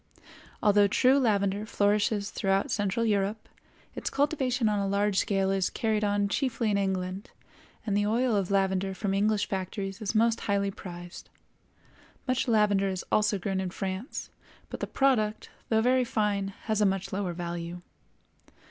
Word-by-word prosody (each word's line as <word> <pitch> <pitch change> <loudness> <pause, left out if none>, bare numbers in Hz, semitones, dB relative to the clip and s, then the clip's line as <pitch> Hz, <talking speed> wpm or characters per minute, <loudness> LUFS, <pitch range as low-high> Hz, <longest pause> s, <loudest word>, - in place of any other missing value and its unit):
Although 205 -1 +5
true 255 +7 +4
lavender 200 -4 +1
flourishes 205 0 +1
throughout 195 0 0
central 205 +2 0
Europe, 205 0 0 0.5
its - - -4
cultivation 270 -5 +1
on 210 -1 +1
a 200 - 0
large 200 0 +1
scale 195 -1 +1
is 195 -1 +1
carried 220 -2 -1
on 205 0 +1
chiefly 230 -1 0
in 200 - +2
England, 190 +1 -2 0.6
and 205 -3 0
the 205 0 +2
oil 235 +1 +2
of 195 -3 0
lavender 195 -1 +1
from 195 0 -2
English 205 +1 +1
factories 195 +1 -4
is 215 +1 -3
most 230 +1 +3
highly 200 0 +1
prized. 175 -2 -10 1.0
Much 255 +1 0
lavender 210 -3 +3
is 185 -2 -4
also 210 -1 +2
grown 190 0 -2
in 190 -1 -2
France, 190 - -5 0.4
but - - -5
the - - -3
product, 220 -6 +1 0.2
though 220 -1 +3
very 255 +1 +3
fine, 210 -4 0 0.2
has 215 -1 0
a - - +5
much 195 -1 -2
lower 190 -2 -2
value. 175 0 -5
205 Hz, 155 wpm, -28 LUFS, 195-220 Hz, 1.0 s, Although